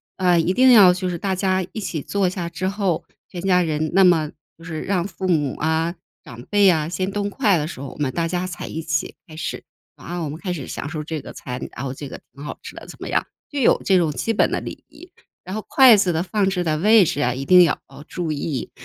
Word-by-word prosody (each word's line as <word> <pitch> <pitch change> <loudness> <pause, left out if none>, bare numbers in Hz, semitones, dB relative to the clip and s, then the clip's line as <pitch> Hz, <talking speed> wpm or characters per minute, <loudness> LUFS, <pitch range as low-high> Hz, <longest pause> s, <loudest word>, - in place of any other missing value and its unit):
啊， 180 -2 +3
一 170 +3 +2
定 255 +4 +6
要 200 -7 +8
就 185 0 -3
是 175 - -3
大 190 +2 -2
家 185 0 0
一 - - -4
起 170 -7 -4
坐 195 +4 0
下 175 -2 -4
之 185 +2 -3
后， 195 -4 -1 0.3
全 175 - -7
家 180 -1 +3
人 155 -2 -1
那 195 +1 +5
么 165 -4 +3 0.3
就 165 - -16
是 160 -2 -5
让 185 -3 0
父 190 -1 -5
母 150 -6 +1
啊、 160 +2 0 0.3
长 125 -6 -11
辈 205 +5 +4
啊 160 -3 +2
先 185 +2 -2
动 205 0 -2
筷 205 -4 +2
的 150 -1 -2
时 155 - -8
候， 140 0 -6
我 - - -12
们 140 -3 -1
大 170 -1 -1
家 180 +2 -2
才 175 - -7
一 160 - -5
起 155 -1 -2
开 155 - -12
始。 160 - -5 0.3
啊， 175 +1 -6
我 150 - -3
们 155 +3 -7
开 185 -1 -4
始 145 -7 -6
享 145 - -6
受 155 -1 -4
这 155 -1 -5
个 - - -10
菜， 125 -1 -6 0.2
然 135 - -5
后 130 - -3
这 140 +1 -8
个 - - -8
挺 140 - -11
好 150 - -6
吃 - - -9
的 - - -10
怎 - - -11
么 - - -6
样， - - 0 0.2
就 290 - -4
有 255 - +4
这 190 - +4
种 160 -3 +1
基 145 - -2
本 220 - +3
的 - - 0
礼 - - -8
仪。 350 0 -16 0.3
然 185 +2 -6
后 215 - -4
筷 260 -4 +7
子 185 -3 +2
的 165 +1 -1
放 195 +1 0
置 180 -2 -1
的 155 -2 0
位 210 +2 +6
置 145 - -1
啊， 125 - +2
一 135 +2 -5
定 180 +2 +7
要 165 - +1 0.3
注 175 -3 -3
意。 145 -3 -3
175 Hz, 285 characters per minute, -22 LUFS, 155-190 Hz, 0.3 s, 要